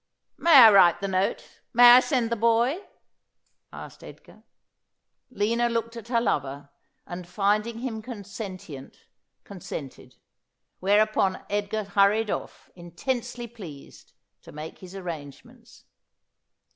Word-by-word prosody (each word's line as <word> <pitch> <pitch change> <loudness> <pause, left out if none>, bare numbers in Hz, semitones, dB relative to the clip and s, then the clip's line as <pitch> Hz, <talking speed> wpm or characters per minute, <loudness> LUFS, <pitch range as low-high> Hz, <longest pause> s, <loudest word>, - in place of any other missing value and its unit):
' - - -57
May 335 -2 +5
I 235 -5 +10
write 185 -4 +5
the 200 - -3
note? 190 0 -3
May 240 +1 +8
I 245 - +9
send 255 -4 -1
the - - +1
boy 235 - +1 0.4
?' - - -49
asked - - -16
Edgar. - - -15 0.9
Lina 235 +1 0
looked 230 0 -3
at 230 -1 -9
her 235 -1 +1
lover, 140 - -3 0.3
and 175 0 -8
finding 210 +5 0
him 230 -4 -4
consentient, 200 - -9 0.4
con 200 -2 -11
sented; 135 -5 -9 0.6
whereupon 205 -1 +1
Edgar 205 +1 -2
hurried 200 +2 +2
off, - - -7
intensely 235 +8 -5
pleased, 190 -12 -13 0.3
to - - -14
make 155 +2 -9
his 185 0 -12
arrangements. 160 -7 -10
205 Hz, 125 wpm, -25 LUFS, 180-235 Hz, 0.9 s, I